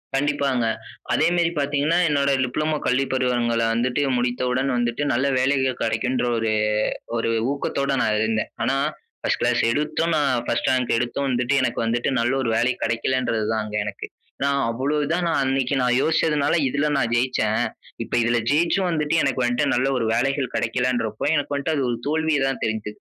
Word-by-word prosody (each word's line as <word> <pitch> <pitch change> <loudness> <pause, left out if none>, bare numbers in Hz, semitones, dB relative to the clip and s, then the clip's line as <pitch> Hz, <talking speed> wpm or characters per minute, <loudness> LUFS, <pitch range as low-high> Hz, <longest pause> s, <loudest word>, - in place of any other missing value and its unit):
கண்டிப்பாங்க 140 -3 0 0.5
அதே - - +3
மேரி 170 -1 +2
பாத்தீங்கன்னா, 145 +4 +1
என்னோட 140 -2 +1 0.2
டிப்ளமோ 155 +5 -1
கல்விப் 135 +2 +1
பருவங்கள 120 -3 +1
வந்துட்டு 125 +4 0 0.2
முடித்தவுடன் 125 +2 0
வந்துட்டு, 120 +3 -1
நல்ல 130 +3 +1
வேலைகள் 130 -1 +1
கெடைக்குன்ற 120 +3 0
ஒரு 110 -1 0 0.7
ஒரு 115 - -1 0.2
ஊக்கத்தோட 140 0 -2
நான் 105 0 +1
இருந்தேன். 110 0 -1
ஆனா, 135 - +1 0.5
பர்ஸ்ட் - - 0
கிளாஸ் - - +2
எடுத்தும், 155 +5 0
நான் 145 -3 +2
பர்ஸ்ட் - - 0
ரேங்க் 125 -2 0
எடுத்தும் 125 +4 -1
வந்துட்டு 125 +1 0
எனக்கு 125 -2 -1
வந்துட்டு 120 +3 0
நல்ல 120 +2 +1
ஒரு 120 - -1
வேலை 120 +3 +2
கெடைக்கலன்றது 115 -1 0
தான், 110 -1 -1
அங்க 105 0 -4
எனக்கு. 105 -2 -5 0.3
ஏன்னா 140 - +1 0.2
அவ்ளோ 130 +6 -1
இதா, 160 +4 0
நான் 165 -4 +1
அன்னைக்கி 135 0 0
நான் 125 0 +2
யோசிச்சதுனால 155 -2 +1
இதுல 140 +3 0
நான் 120 -4 0
ஜெயிச்சேன், 120 -3 +1 0.4
இப்ப - - -11
இதுல 120 +1 +2
ஜெயிச்சும் 170 +5 +2
வந்துட்டு, 155 -1 0
எனக்கு 130 - 0
வந்த்துட்டு 120 0 +1
நல்ல 130 +2 +1
ஒரு 115 - -1
வேலைகள் 130 +2 0
கெடைக்கலன்றப்போ, 115 -2 -1
எனக்கு 145 -1 -1
வந்த்ட்டு 140 +3 -1
அது 140 - 0
ஒரு 120 - -1
தோல்வியா 160 0 +1
தான் 135 - -3
தெரிது. 110 -1 -3
130 Hz, 165 wpm, -23 LUFS, 120-145 Hz, 0.7 s, அதே